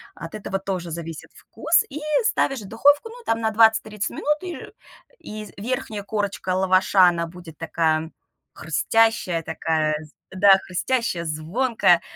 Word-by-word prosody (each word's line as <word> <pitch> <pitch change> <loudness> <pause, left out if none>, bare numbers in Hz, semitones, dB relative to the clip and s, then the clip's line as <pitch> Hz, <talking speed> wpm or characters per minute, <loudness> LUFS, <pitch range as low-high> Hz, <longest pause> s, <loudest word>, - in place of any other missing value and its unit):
от 165 +5 -8
этого 195 -2 -4
тоже 185 -3 -4
зависит 165 -1 -7
вкус, 340 +2 +1
и 295 +2 -6 0.3
ставишь 270 - +1
в 195 - -10
духовку, 290 - +3
ну, 480 +1 -12
там 225 0 0
на 220 - +1
20-30 215 -1 +2
минут 300 +1 0
и 355 -2 -6 0.6
и 215 0 -8
з - - -14
верхняя 215 -2 -4
корочка 205 -3 -2
лаваша, 185 0 +4
она 170 -1 +1
будет 170 -2 -12
такая 160 -1 0 0.4
хрустящая, 180 +3 +1
такая 155 -1 -1
з 155 - -19 0.2
да, 200 +1 +4 0.2
хрустящая, 210 -2 -1
звонкая, 170 +4 +2
195 Hz, 145 wpm, -23 LUFS, 165-225 Hz, 0.6 s, лаваша